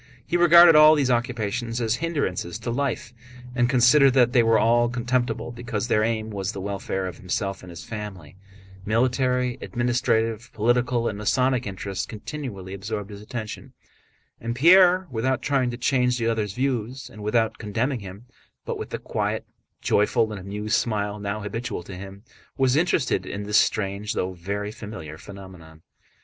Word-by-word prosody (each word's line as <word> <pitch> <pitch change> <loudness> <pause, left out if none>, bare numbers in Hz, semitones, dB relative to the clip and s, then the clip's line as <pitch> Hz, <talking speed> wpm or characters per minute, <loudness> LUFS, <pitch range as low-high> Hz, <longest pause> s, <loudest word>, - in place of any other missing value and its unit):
He - - -2
regarded 175 -1 +8
all 155 +1 +8
these 135 -4 +1
occupations 120 -1 -1
as 115 -1 0
hindrances 140 - -2
to 120 - -4
life, 125 -2 -2 0.4
and 120 -1 +2
considered 130 +2 +5
that 125 -2 +4
they 125 - +6
were 115 -1 +4
all 120 +1 +3
contemptible 120 -1 -1
because 120 -2 -4
their 110 -3 +2
aim 110 -1 -1
was 100 0 -3
the - - -6
welfare 95 -1 -3
of 90 - -7
himself 95 +1 -3
and 90 - -11
his 85 -1 -9
family. 95 -5 -8 0.5
Military, 125 +3 +1
administrative, 120 -2 0
political, 120 +1 +1
and 105 - -3
Masonic 125 +3 +1
interests 95 0 -4
continually 105 -5 -7
absorbed 105 +1 -5
his 100 0 -9
attention. 110 0 -7 0.7
And 115 +1 -4
Pierre, 180 +5 +6
without 130 +2 -1
trying 135 -3 +1
to 120 - -5
change 125 -1 +1
the 115 - -2
other's 110 -4 -1
views 125 0 -2
and 110 -4 -12
without 110 +1 0
condemning 115 +5 -1
him, 100 +3 -10 0.4
but - - -4
with - - -6
the - - -3
quiet, - - -3 0.4
joyful, 110 +2 +2
and 100 -3 -6
amused 105 +3 -1
smile 105 -2 -2
now 100 +1 -3
habitual 105 -2 -4
to 95 - -9
him, 100 +2 -10 0.3
was 130 -1 +3
interested 150 - +1
in 100 +1 -5
this 105 +1 +2
strange 100 0 -1
though 95 +1 -2
very 100 +4 -4
familiar 105 -9 -9
phenomenon. 90 -5 -12
115 Hz, 160 wpm, -24 LUFS, 100-125 Hz, 0.7 s, regarded